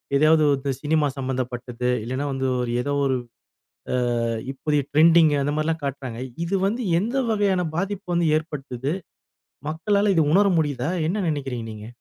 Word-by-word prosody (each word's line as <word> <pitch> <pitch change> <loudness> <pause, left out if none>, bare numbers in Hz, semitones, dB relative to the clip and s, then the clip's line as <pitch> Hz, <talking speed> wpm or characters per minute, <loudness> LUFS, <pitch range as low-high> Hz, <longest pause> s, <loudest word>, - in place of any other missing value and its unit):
எதையாவது 155 +2 +5
வந்து 135 0 -2
சினிமா 155 -1 +2
சம்மந்தப்பட்டது. 125 -2 -3
இல்லனா 130 +4 -3
வந்து 135 0 -1
ஒரு 120 -1 -2
ஏதோ 145 0 -1
ஒரு 130 -1 +1 0.8
அ - - +2 0.5
இப்போதைய 145 +2 0
ட்ரெண்டிங் 160 0 +6
அந்த 145 +1 0
மாரிலாம் 160 +1 -1
காட்டுறாங்க. 130 -4 -5 0.3
இது 195 +3 -1
வந்து 235 +5 -2 0.2
எந்த 240 +6 -2
வகையான 200 -4 +2 0.2
பாதிப்பு 195 +1 -3
வந்து 170 0 +2
ஏற்படுத்துது? 140 -3 -4 0.8
மக்களால 200 +5 +1
இது 160 - +4
உணர 200 +1 +5
முடியுதா? 145 -1 -1 0.2
என்ன 205 +5 -1
நினைக்கிறீங்க 135 -6 -3
நீங்க? 105 0 -9
150 Hz, 145 wpm, -23 LUFS, 130-170 Hz, 0.8 s, ட்ரெண்டிங்